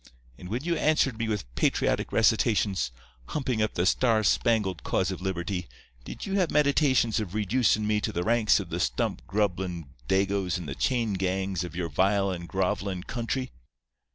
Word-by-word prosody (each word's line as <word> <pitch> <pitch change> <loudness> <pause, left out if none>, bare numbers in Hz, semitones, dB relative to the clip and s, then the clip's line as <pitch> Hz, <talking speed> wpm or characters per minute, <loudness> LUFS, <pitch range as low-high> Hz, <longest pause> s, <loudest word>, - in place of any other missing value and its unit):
And 90 +7 -10
when 120 +6 -3
you 170 +1 0
answered 150 -7 +2
me 115 - -1
with 100 - -3
patriotic - - +1
recitations, 105 - +2 0.4
humping 130 -6 -1
up 110 - 0
the 85 - +1
star 110 +2 +3
spangled 105 - +1
cause 95 0 0
of 95 - -6
liberty, 90 -1 -3 0.4
did - - -7
you 195 - -4
have 180 -4 +2
meditations 140 -6 +3
of 105 -3 -5
reducin' 110 +1 +2
me 105 0 +1
to 110 - -1
the 90 -4 -2
ranks 110 0 +3
of 95 -4 -7
the 85 - -2
stump 85 - -1
grubbin' 90 -6 -1 0.2
Dagoes 95 -1 +1
in 90 - -7
the 70 - -4
chain 115 - 0
gangs 95 -1 -1
of 90 -1 -7
your 90 -1 -2
vile 95 +5 +2
and 85 -2 -6
grovelin' 95 -1 -1
country? 125 +3 -3
100 Hz, 175 wpm, -27 LUFS, 90-115 Hz, 0.4 s, star